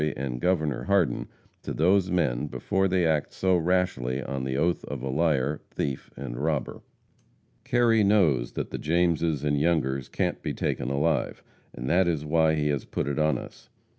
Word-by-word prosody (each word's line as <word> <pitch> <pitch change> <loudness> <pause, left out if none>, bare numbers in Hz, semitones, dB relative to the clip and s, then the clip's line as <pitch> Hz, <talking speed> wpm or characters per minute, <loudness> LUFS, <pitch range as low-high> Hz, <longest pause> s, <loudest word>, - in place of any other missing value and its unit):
and 65 -2 -4
Gov. 80 -5 0
Hardin 95 -10 +1 0.3
to - - -5
those 90 +3 +3
men 75 -7 0
before 95 +6 0
they 90 -2 +1
act 80 -3 +1
so 95 -1 +2
rashly 85 -8 0
on 70 -1 -4
the 65 0 -2
oath 85 +4 +1
of 65 -2 -6
a 65 - -2
liar, 75 -1 +1
thief 70 -2 -4
and - - -6
robber. 75 -3 -2 0.8
Kerry 120 -4 +3
knows 85 - +3
that - - -4
the - - -4
Jameses 85 -2 +1
and 75 -1 +1
Youngers 70 -6 0
can't - - -2
be - - -3
taken 60 - -2
alive, 75 +3 0 0.3
and - - -7
that 90 +5 +3
is 80 -3 -1
why 80 0 +3
he 75 -1 0
has 70 -3 -1
put - - -3
it 70 +1 -1
on 75 0 +2
us. - - -11
75 Hz, 175 wpm, -26 LUFS, 70-90 Hz, 0.8 s, those